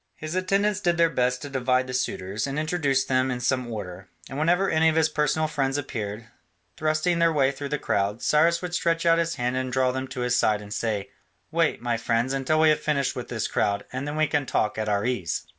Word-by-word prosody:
His 155 +1 -6
attendants 195 +2 +1
did 175 -4 +1
their 165 -1 +4
best 125 -2 0
to 145 - -6
divide 130 -1 +1
the 130 - -7
suitors, 105 -3 -2
and 140 +1 -4
introduce 155 -4 +1
them 130 0 +1
in 125 -1 -2
some 125 0 -1
order, 95 -4 -7 0.2
and 135 - -6
whenever 175 +5 +2
any 160 -1 +3
of 160 - -1
his 160 -1 +3
personal 150 +1 +1
friends 135 -2 -1
appeared, 110 -5 -5 0.5
thrusting 155 +3 0
their 165 0 +4
way 140 -3 +2
through 140 +1 -6
the 150 - -1
crowd, 100 -2 -1
Cyrus 165 +3 +3
would 180 0 -4
stretch 165 -1 0
out 165 0 +5
his 165 0 -1
hand 125 +1 -1
and 130 0 -2
draw 130 0 +2
them 130 +1 -4
to 130 -1 -6
his 125 0 +1
side 110 -3 +2
and 105 0 -8
say, 105 -3 -2 0.4
"Wait, 165 -6 +1
my 120 -1 0
friends, 115 +3 0
until 135 +3 +1
we 160 - +6
have 155 - +3
finished 140 -3 0
with 125 - -5
this 115 -3 -2
crowd, 100 0 0
and 130 +3 -3
then 145 - -3
we 155 0 +3
can 145 -2 -1
talk 105 0 0
at 110 -1 -1
our 100 +1 0
ease." 100 -10 -2
135 Hz, 235 wpm, -25 LUFS, 120-155 Hz, 0.5 s, we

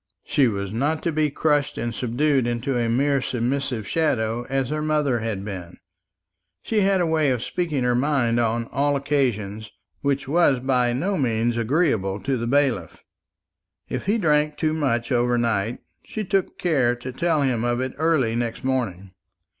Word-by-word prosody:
She 140 -3 +2
was 100 -2 -3
not 145 +7 0
to 170 - 0
be 155 -1 +1
crushed 145 -1 0
and 120 0 -2
subdued 130 +2 +1
into 120 +3 -1
a 120 -1 0
mere 140 +3 +2
submissive 125 -2 -2
shadow, 120 -7 0
as 135 -1 0
her 155 0 -2
mother 150 -5 +1
had 110 -3 -3
been. 90 -4 -7 0.9
She 220 - 0
had 195 -1 +3
a - - +2
way 160 -3 +2
of 125 -2 0
speaking 155 -7 -2
her 125 0 +2
mind 125 -3 +1
on 115 0 0
all 145 +1 +1
occasions 115 -7 -1 0.3
which 140 -1 -1
was 145 -3 +3
by 125 -1 +1
no 185 +9 -1
means 115 -2 +1
agreeable 115 - +1
to 135 -1 0
the 115 -1 -3
bailiff. 140 0 0 0.9
If - - -4
he 210 +3 +3
drank 150 -5 +2
too 155 -1 0
much 135 -6 -1
overnight, 120 -2 +1 0.2
she 215 - -5
took 195 -1 -1
care 135 -9 +2
to 125 +1 -7
tell 155 +2 +1
him 125 -4 0
of 120 0 0
it 130 0 -2
early 155 -8 +2
next 120 0 -3
morning. 105 -8 -2
130 Hz, 170 wpm, -23 LUFS, 115-150 Hz, 0.9 s, had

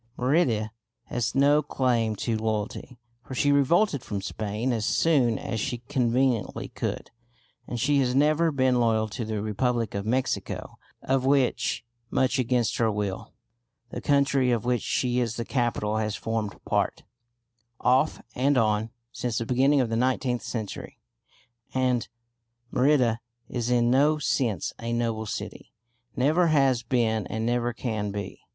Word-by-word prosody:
Merida 125 -6 +1 0.3
has 120 0 -2
no 145 +2 +5
claim 120 -6 0
to 115 +2 -1
loyalty, 110 +3 -3 0.3
for 130 - -8
she 145 +3 +2
revolted 140 - +3
from 105 -5 -4
Spain 105 +6 -2
as 110 -2 -1
soon 130 -3 +2
as 115 - -4
she 120 +2 -2
conveniently 125 -2 0
could, - - -4 0.6
and 120 - -4
she 140 +4 +2
has 125 -1 +1
never 155 +4 +3
been 130 -3 +2
loyal 110 -2 +2
to 115 +3 -4
the 110 -2 -3
Republic 115 +2 -1
of 100 - -2
Mexico, 130 +3 -2 0.2
of 135 -1 +1
which 130 -3 +1 0.2
much 130 0 +1
against 125 -2 +1
her 115 -2 +2
will 100 -2 -4 0.6
the - - -5
country 140 -2 +2
of 120 -2 0
which 125 -2 +1
she 125 -1 0
is 115 -2 -1
the 115 - -4
capital 115 -4 0
has 110 -1 -1
formed 110 -2 -3
part, - - 0 0.8
off 130 +5 +2
and 135 +2 +2
on, 110 -1 +2 0.2
since 120 -2 -3
the 115 - -1
beginning 135 +4 +3
of 120 - -1
the 115 - -1
nineteenth 125 0 0
century. 110 -4 -6 0.8
And 125 -3 +1 0.6
Merida 125 -4 +3 0.3
is 120 -1 -3
in 120 -1 +3
no 145 +4 +4
sense 125 - -1
a 115 0 -3
noble 115 -2 -1
city; - - -6 0.4
never 155 +7 +3
has 135 -6 +3
been 115 -3 0
and 110 0 -3
never 120 0 0
can 110 -3 -3
be. 100 0 -6
120 Hz, 150 wpm, -26 LUFS, 110-130 Hz, 0.8 s, no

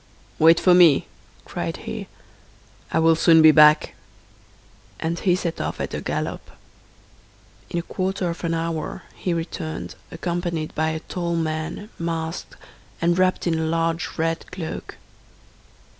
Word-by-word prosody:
"Wait 165 +1 +6
for 180 - +5
me," 170 -6 +6 0.4
cried - - -4
he, - - -5 0.8
"I - - +1
will 165 0 +5
soon 160 0 +6
be 155 - +9
back," 150 0 +6 1.1
and 165 +1 -2
he 180 -3 +2
set 175 -3 -3
off - - -4
at - - -4
a - - -3
gallop. - - -4 1.2
In - - -3
a 170 - -1
quarter 190 0 -2
of 170 - -9
an 165 -1 0
hour 165 -1 -3
he 180 - -3
returned, 165 -1 -4 0.2
accompanied 170 -2 -3
by 160 +1 0
a 160 0 -3
tall 170 -1 -3
man, 160 +5 -3
masked, 165 0 -4 0.4
and 175 +1 +2
wrapped 185 0 +2
in 165 -2 +1
a - - 0
large 165 +1 -1
red 165 0 -2
cloak. 180 -4 -6
165 Hz, 145 wpm, -23 LUFS, 160-175 Hz, 1.2 s, be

